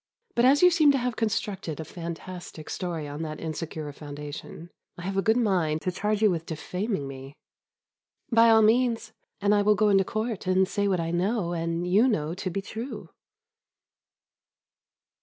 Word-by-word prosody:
But, 240 - +3
as 280 +5 +5
you 360 - +8
seem 310 -4 +5
to - - +2
have 250 -2 -2
constructed 205 -7 -2
a 160 - -5
fantastic 170 0 -8
story 170 -5 -3
on 145 +2 -6
that 155 -1 -5
insecure 155 -1 -5
foundation, 150 +3 -8 0.3
I 175 - -8
have 195 +2 -3
a 195 - +2
good 220 +4 +3
mind 175 -9 +1
to 185 - 0
charge 210 +3 -1
you 210 - +6
with 165 -1 -3
defaming 180 - -3
me." 135 +1 -9 1.0
"By 230 0 +6
all 220 -1 +6
means, 230 +1 +2 0.3
and 205 +1 +3
I 205 - +4
will 210 +1 +4
go 215 0 +3
into 195 -1 +5
court 215 0 -3
and 185 0 +3
say 200 +1 0
what 190 -3 +1
I 165 0 -2
know 180 +1 0
and 165 +1 -2
you 200 +8 +4
know 160 -9 0
to 185 +1 -4
be 195 +2 -3
true." 225 +6 -7
185 Hz, 175 wpm, -27 LUFS, 165-220 Hz, 1.0 s, you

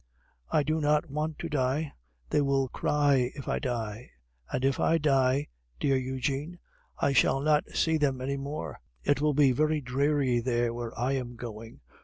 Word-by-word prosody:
I 150 - +2
do 155 +2 0
not 150 +1 +1
want 150 +1 -2
to 170 - -4
die; 145 0 -1 0.4
they - - +3
will 135 -2 +1
cry 140 -4 +2
if 140 - -8
I - - 0
die; 115 -2 -4 0.4
and 130 - 0
if 135 -1 +1
I 165 - +3
die, 135 -2 +2 0.3
dear 135 -1 +2
Eugene, 135 +5 -2 0.4
I 140 - +2
shall 135 - +4
not 150 +1 +2
see 160 -1 +2
them 140 -4 +1
any 135 +2 -2
more. 140 +2 -5 0.2
It 145 - +2
will 150 -1 +2
be 140 -2 +5
very 155 +4 +1
dreary 135 -1 +1
there 120 -1 0
where 120 -1 -6
I 125 +3 +1
am 125 -3 -3
going. 115 -1 -9
135 Hz, 175 wpm, -29 LUFS, 125-150 Hz, 0.4 s, be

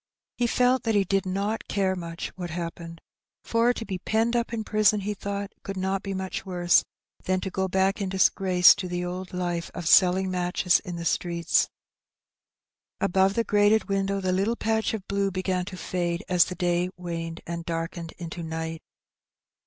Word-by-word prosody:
He 245 - +1
felt 250 +2 +3
that 225 -2 0
he 200 - +4
did 195 0 0
not 200 +4 -2
carQ 190 -2 +1
much 170 -2 -5
what 180 -2 -7
happened, 170 0 -6 0.4
for 230 +1 +2
to 235 -2 -5
be 190 -4 -4
penned 225 +4 +1
up 235 -1 0
in 225 -2 -2
prison, 215 -1 +3
he 210 +2 -2
thought, 200 0 -4
could 195 -1 -6
not 190 +1 -1
be 195 -1 -4
much 190 0 -4
worse 175 -2 +3 0.4
than 185 0 +1
to 190 - -4
go 190 +1 -1
back 190 +2 +1
in 195 - -1
disgrace 185 -1 +5
to 200 -3 -5
the 180 0 -3
old 180 +1 -5
life 175 -2 -2
of 175 -2 -4
selling 185 +1 +5
matches 180 0 +2
in 180 -4 -7
the 170 0 -5
streets. 170 -1 +1 1.3
Above 195 0 +2
the 230 - +2
grated 210 0 +3
window 195 0 0
the 185 -1 -1
little 195 +5 +1
patch 220 -1 0
of 195 -3 -8
blue 200 0 0
began 185 -1 -1
to 185 -1 -8
fade 175 -2 -2
as 180 -2 +4
the 180 - -6
day 175 0 0
waned 165 -1 -5
and 170 0 -4
darkened 165 0 -4
into 170 0 -6
night. 160 0 -4
185 Hz, 185 wpm, -26 LUFS, 175-200 Hz, 1.3 s, disgrace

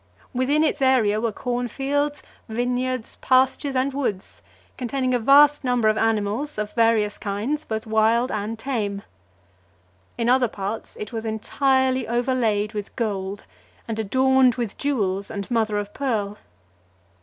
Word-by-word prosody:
Within 270 +5 +2
its 300 -2 0
area 230 -6 +3
were 230 -1 0
corn 245 +3 -2
fields, 285 +4 -1 0.3
vineyards, 245 +1 -2
pastures, 265 +2 +2
and 260 +2 +1
woods, 230 -9 -3 0.3
containing 255 +1 -1
a 245 - +2
vast 290 +5 +6
number 245 -3 +2
of 215 - +2
animals 225 +6 0
of 210 0 -3
various 225 -3 +2
kinds, 220 +10 -2
both 220 -1 -4
wild 220 +3 +2
and 215 +2 -3
tame. 215 -5 -3 1.1
In 230 -1 0
other 250 0 +4
parts 205 +1 -5
it 210 +2 -6
was 225 -1 -3
entirely 260 +3 +1
over 240 +3 0
laid 215 -3 0
with 210 -2 -6
gold, 200 -3 -3 0.4
and 225 -1 -3
adorned 260 +3 +3
with 235 -5 -3
jewels 200 -9 -1
and 200 +3 -6
mother 220 -3 +1
of 205 0 -4
pearl. 210 -7 -2
235 Hz, 145 wpm, -23 LUFS, 210-260 Hz, 1.1 s, vast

